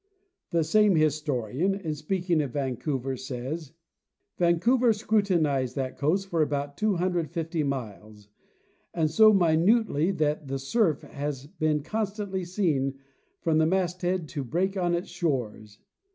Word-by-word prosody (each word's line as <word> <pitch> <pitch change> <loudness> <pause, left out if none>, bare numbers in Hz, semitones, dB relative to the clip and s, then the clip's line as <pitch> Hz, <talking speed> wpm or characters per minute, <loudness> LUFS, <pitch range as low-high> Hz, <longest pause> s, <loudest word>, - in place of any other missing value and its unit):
The 170 -1 +1
same 205 +4 +4
histo 150 -5 +1
rian, 190 +8 0
in 160 -5 -3
speaking 170 +2 0
of 140 -4 -4
Vancouver, 135 -1 -2
says: 130 +4 -6 0.3
" - - -55
Vancouver 225 +8 +3
scrutinized 175 - +1
that 130 -2 -3
coast 185 +7 0
for 165 -3 +1
about 145 -1 -1
250 175 -4 -1
miles, 110 -6 -5 0.7
and 160 -3 +1
so 215 +5 +7
minutely 175 -1 +3
that 155 -5 -1
the 135 +1 -2
surf 160 - +1
has 140 -2 -5
been 150 -1 -1
constantly 200 0 -3
seen 160 -8 0 0.5
from 160 -2 +2
the 160 - +4
mast 180 0 0
head 180 -2 -1
to 145 -4 -4
break 180 +9 -1
on 175 -2 +1
its 175 - -4
shores. 115 - -3
160 Hz, 140 wpm, -27 LUFS, 140-185 Hz, 0.7 s, so